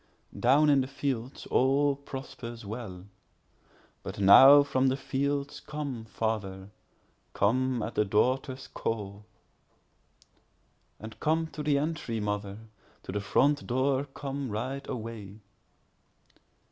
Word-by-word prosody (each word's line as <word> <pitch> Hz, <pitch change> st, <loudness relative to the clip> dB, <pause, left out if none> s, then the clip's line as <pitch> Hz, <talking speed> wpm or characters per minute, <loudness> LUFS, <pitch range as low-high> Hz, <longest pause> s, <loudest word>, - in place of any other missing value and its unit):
3Down 140 Hz, +5 st, +4 dB
in 140 Hz, -1 st, +4 dB
the 130 Hz, -, -3 dB
fields 130 Hz, -2 st, -4 dB
all 140 Hz, +2 st, +3 dB
prospers 130 Hz, -4 st, -8 dB
well; 100 Hz, -4 st, -7 dB, 1.0 s
But -, -, -7 dB
now 135 Hz, +9 st, +9 dB
from 135 Hz, -2 st, +1 dB
the 130 Hz, +1 st, +1 dB
fields 140 Hz, +1 st, -2 dB
come, 140 Hz, -7 st, -6 dB
father—come 110 Hz, +3 st, -3 dB
at -, -, -4 dB
the -, -, +2 dB
daughter's 130 Hz, +6 st, 0 dB
call; 105 Hz, -2 st, -5 dB, 1.7 s
And 110 Hz, 0 st, -10 dB
come 160 Hz, +2 st, +1 dB
to 155 Hz, -, -7 dB
the 145 Hz, -1 st, +2 dB
entry, 145 Hz, -6 st, -2 dB
mother—to 105 Hz, 0 st, -6 dB
the 100 Hz, +1 st, -2 dB
front 145 Hz, +7 st, +2 dB
door 130 Hz, +2 st, +1 dB
come, 140 Hz, -1 st, -5 dB
right 130 Hz, +6 st, -4 dB
away. 110 Hz, -3 st, -7 dB
130 Hz, 110 wpm, -29 LUFS, 110-140 Hz, 1.7 s, now